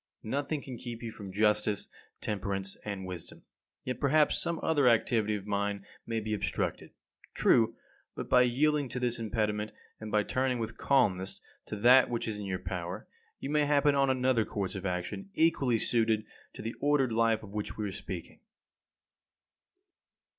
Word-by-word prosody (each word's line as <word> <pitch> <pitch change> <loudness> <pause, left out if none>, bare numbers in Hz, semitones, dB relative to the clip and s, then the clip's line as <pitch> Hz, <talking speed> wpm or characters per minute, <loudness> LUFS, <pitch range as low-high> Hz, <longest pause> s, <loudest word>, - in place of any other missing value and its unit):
Nothing 140 +5 -2
can 125 -3 -7
keep 120 -1 -7
you 115 - -4
from 100 -3 -9
justice, 105 0 +1 0.3
temperance, 95 -2 -2
and 100 -2 -4
wisdom. 90 -3 -7 0.4
Yet, 125 -1 -3
perhaps 150 +1 +3
some 170 -1 -2
other 145 -6 +4
activity 110 -2 +2
of 100 -2 -6
mine 100 -1 -1 0.2
may 115 -1 -1
be 110 0 -3
obstructed. 105 - -2 0.5
True, 115 -2 +4 0.4
but - - -5
by 125 - +6
yielding 140 +3 +2
to 125 - -3
this 120 -1 -1
impediment, 105 -1 -1 0.3
and 110 -1 -7
by 105 0 +3
turning 130 +3 0
with 115 -1 -4
calmness 100 -9 +1 0.3
to - - -4
that 125 +5 +6
which 120 -1 -2
is 105 -2 -3
in 105 - -5
your 95 -1 -2
power, 90 +2 -5 0.3
you 140 - -4
may 150 -1 +3
happen 145 0 +4
on 135 -1 +3
another 130 -3 +2
course 100 -3 -3
of 95 0 -3
action 90 - -4
equally 140 -7 +3
suited 110 -1 +1 0.3
to - - -8
the 115 - -3
ordered 145 -4 +2
life 115 -1 +2
of 100 -1 -11
which 105 -1 -4
we 105 -1 -2
are - - -4
speaking. 95 -2 -7
110 Hz, 170 wpm, -30 LUFS, 105-130 Hz, 0.5 s, by